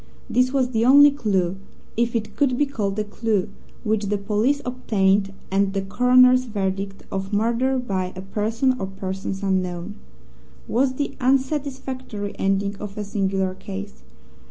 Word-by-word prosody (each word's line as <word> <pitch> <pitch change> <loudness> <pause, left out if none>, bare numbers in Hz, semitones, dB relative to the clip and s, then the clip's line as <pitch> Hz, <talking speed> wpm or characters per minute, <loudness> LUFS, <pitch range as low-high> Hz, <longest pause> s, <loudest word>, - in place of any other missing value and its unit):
This 255 +1 +2
was 260 -2 +1
the 225 -2 +1
only 285 +4 +8
clue, 195 -9 0 0.4
if 235 +1 0
it 220 -2 -2
could 265 -4 +2
be 290 - +3
called 210 -7 -3
a 215 - +1
clue, 210 -2 -1 0.3
which 215 -2 0
the 205 +1 0
police 215 +8 +1
obtained, 200 -6 +1 0.2
and 195 0 +2
the 195 - 0
coroner's 250 +4 +5
verdict 195 -2 -3
of 195 +1 -3
"Murder 235 +5 +1
by 190 -7 -2
a 185 - -6
person 225 +6 0
or 190 - -2
persons 190 0 -5
unknown" 185 -1 -1 0.7
was 260 +3 +1
the 285 +1 -2
unsatisfactory 260 -5 -1
ending 195 +1 +1
of 210 0 -8
a 210 - -2
singular 195 -2 -1
case. 200 +1 -8
210 Hz, 150 wpm, -23 LUFS, 195-255 Hz, 0.7 s, only